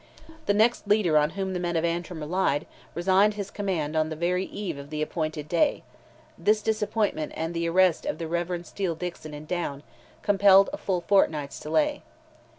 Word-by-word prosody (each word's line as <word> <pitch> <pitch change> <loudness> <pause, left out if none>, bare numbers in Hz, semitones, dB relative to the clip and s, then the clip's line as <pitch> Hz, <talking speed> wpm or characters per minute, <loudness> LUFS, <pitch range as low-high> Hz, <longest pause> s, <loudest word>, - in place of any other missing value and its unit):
The 205 - +3
next 220 0 +2
leader 205 -6 +3
on 150 +1 +4
whom 190 -1 -2
the 180 - -2
men 175 -1 -2
of 165 0 +1
Antrim 170 -1 -3
relied, 150 -2 0 0.3
resigned 195 +4 +3
his 200 -1 -5
command 170 -7 -2
on 155 0 +1
the 155 - -4
very 180 +3 0
eve 180 -8 -5
of 140 0 -10
the 155 0 -2
appointed 155 -1 -3
day; 170 +1 +1 0.6
this 210 0 +2
disappointment 210 -7 -1
and 165 +1 -3
the 170 0 -1
arrest 185 - +3
of 295 - -2
the 165 - -4
Rev. 175 +1 -2
Steele 180 -1 -3
Dickson 165 -3 -6
in 150 +1 -9
Down, 155 -4 -3 0.4
compelled 195 -1 +5
a - - -3
full 185 -3 -1
fortnight's 155 -8 +1
delay. 295 - 0
175 Hz, 180 wpm, -26 LUFS, 155-200 Hz, 0.6 s, compelled